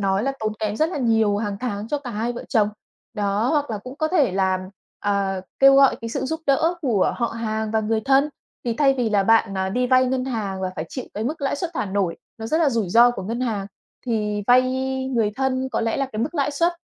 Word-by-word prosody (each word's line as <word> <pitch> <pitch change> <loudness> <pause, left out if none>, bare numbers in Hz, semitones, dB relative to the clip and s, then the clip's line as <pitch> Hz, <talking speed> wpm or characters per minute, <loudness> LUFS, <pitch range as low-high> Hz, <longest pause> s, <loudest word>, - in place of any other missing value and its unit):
nói 195 +1 +1
là 275 +1 0
tốn 215 0 -1
kém 215 -1 -2
rất 315 +5 +2
là 325 - -4
nhiều 225 -4 +2
hằng 205 -2 -2
tháng 215 -4 -3
cho 295 - -1
cả 255 -4 -7
hai 230 +3 -2
vợ 240 - -7
chồng. 210 -3 +3 0.5
Đó, 205 +3 0
hoặc 290 -5 0
là 215 - -2
cũng 255 +6 -10
có 310 +1 0
thể 370 - 0
có 285 - +6
thể 190 - -2
là, 190 -1 +1 0.5
ờ, 200 -2 0 0.2
kêu 275 0 +7
gọi 275 -1 +5
cái 230 - -5
sự 270 +3 -3
giúp 320 +4 -3
đỡ 320 +5 +3
của 225 -8 +2
họ 235 - 0
hàng 220 -2 -3
và 220 - +1
người 220 +1 0
thân, 275 +2 +4 0.4
thì 235 -2 -1
thay 275 -2 +4
vì 240 -4 -1
là 200 -2 +3
bạn, 225 -2 +3
ờ, 190 0 -1
đi 250 +6 0
vay 255 0 +4
ngân 255 0 -1
hàng 205 -7 -3
và 185 -1 -2
phải 155 - -3
chịu 255 - -6
cái 215 +2 -3
mức 305 +5 -3
lãi 280 0 -1
suất 340 +2 -3
thả - - -1
nổi, 190 -3 -1 0.2
nó 225 - -5
rất 315 +7 +1
là 295 -4 +3
rủi 225 -6 -1
ro 235 +6 +6
của 215 -6 -6
ngân 230 +5 -4
hàng 215 -6 -2 0.4
thì 210 -3 -1
vay 250 +1 +6 0.5
người 220 -3 +2
thân 265 0 0
có - - 0
lẽ 225 -1 0
là 275 -1 0
cái 215 +1 -2
mức 305 +7 -3
lãi 285 -1 +1
suất 335 +5 +1
230 Hz, 265 wpm, -22 LUFS, 205-270 Hz, 0.5 s, kêu